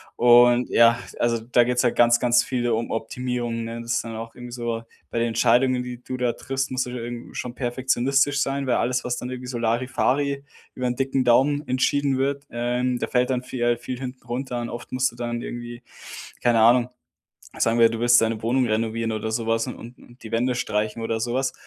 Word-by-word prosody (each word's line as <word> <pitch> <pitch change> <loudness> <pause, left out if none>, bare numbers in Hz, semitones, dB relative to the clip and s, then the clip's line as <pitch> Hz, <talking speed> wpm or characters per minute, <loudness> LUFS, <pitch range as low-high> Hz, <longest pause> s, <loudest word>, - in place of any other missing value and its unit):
Und 120 +1 +5
ja, 115 +1 +5 0.2
also 115 -1 +1
da 120 +2 +3
geht's 125 +1 +1
halt 120 - +1
ganz, 120 0 +5
ganz 120 0 +3
viel 120 -2 -1
um 115 0 -1
Optimierungen, 120 0 -3
ne? 115 +1 -6
Das 115 0 -5
ist - - 0
dann 115 -1 -7
auch 115 +1 -7
irgendwie 125 0 -10
so, 120 -1 -3 0.3
bei 115 - -1
den 115 - +1
Entscheidungen, 125 +3 +3
die 125 -1 -7
du 130 - -5
da 125 -2 0
triffst, 135 0 -3
musst 130 0 0
du - - -7
ja 125 - -5
irgendwie 120 0 -7
schon 120 -1 -4
perfektionistisch 135 +3 +1
sein, 140 0 -1
weil 125 -2 +1
alles, 125 +1 0
was 125 0 -2
dann 125 - -5
irgendwie 125 0 -6
so 125 -1 -4
Larifari 130 +4 0 0.3
über 125 - -2
'n 125 - -1
dicken 135 0 0
Daumen 140 +5 +3
entschieden 135 +2 +1
wird, 140 +1 -1
ähm, 125 +1 -1
da - - -2
fällt 125 0 +1
dann 125 -1 -1
vie 125 -1 -6
äh, 120 0 +2
viel 125 +1 -6
hinten 130 -1 -7
runter 125 +1 -4
an. 120 0 -4
Oft 120 +1 -8
musst 130 0 +1
du - - -17
dann 120 0 -4
irgendwie, 120 0 -7 0.6
keine 120 -2 +3
Ahnung 120 +2 +5 0.7
sagen 115 0 +2
wir, 115 -1 +7
du 115 0 -5
willst 120 0 +6
deine 115 -1 -1
Wohnung 125 +3 +1
renovieren 115 +1 -1
oder 110 0 -3
sowas 115 0 0
und - - -6
und 120 +1 -14
die 110 - -9
Wände 125 +2 +1
streichen 110 -1 -2
oder 115 0 -2
sowas. 125 +3 -1
120 Hz, 215 wpm, -24 LUFS, 115-125 Hz, 0.7 s, wir